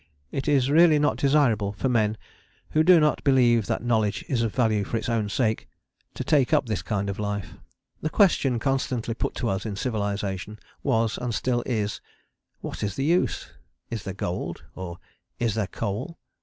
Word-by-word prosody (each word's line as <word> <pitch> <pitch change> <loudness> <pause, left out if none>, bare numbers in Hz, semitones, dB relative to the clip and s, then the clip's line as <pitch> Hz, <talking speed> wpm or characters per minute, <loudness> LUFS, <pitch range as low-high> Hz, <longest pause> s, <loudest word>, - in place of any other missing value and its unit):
It 135 - -3
is 140 -2 +3
really 160 0 +6
not 150 0 +2
desirable 120 -8 +2
for 120 - -2
men 110 -3 +1 0.5
who 155 - +3
do 175 +1 +7
not 150 -1 +2
believe 120 -6 +4
that - - -1
knowledge 110 -4 0
is 125 -4 0
of 115 -2 0
value 110 -5 +2
for 115 - -2
its - - -4
own 115 -3 0
sake 110 +1 0 0.5
to - - -3
take 145 0 +2
up 145 - +2
this 105 -7 -2
kind 100 +4 -2
of 100 0 -4
life. 100 -5 -3 0.5
The 155 - -1
question 150 - +3
constantly 125 -2 -1
put - - -3
to 120 - -1
us 95 +1 -1
in 105 -3 -4
civilization 100 -3 -3 0.2
was 115 -1 +1
and 120 -3 -2
still 120 -2 0
is: 105 -4 -1 0.6
"What - - -6
is 100 -2 -2
the 135 - -1
use? 175 +4 +1 0.4
Is 115 -3 -3
there 95 -1 -5
gold? 85 -3 -4
or 90 -2 -7 0.4
Is 115 -3 0
there 110 -3 -1
coal?" 115 - -4
115 Hz, 185 wpm, -25 LUFS, 105-135 Hz, 0.6 s, do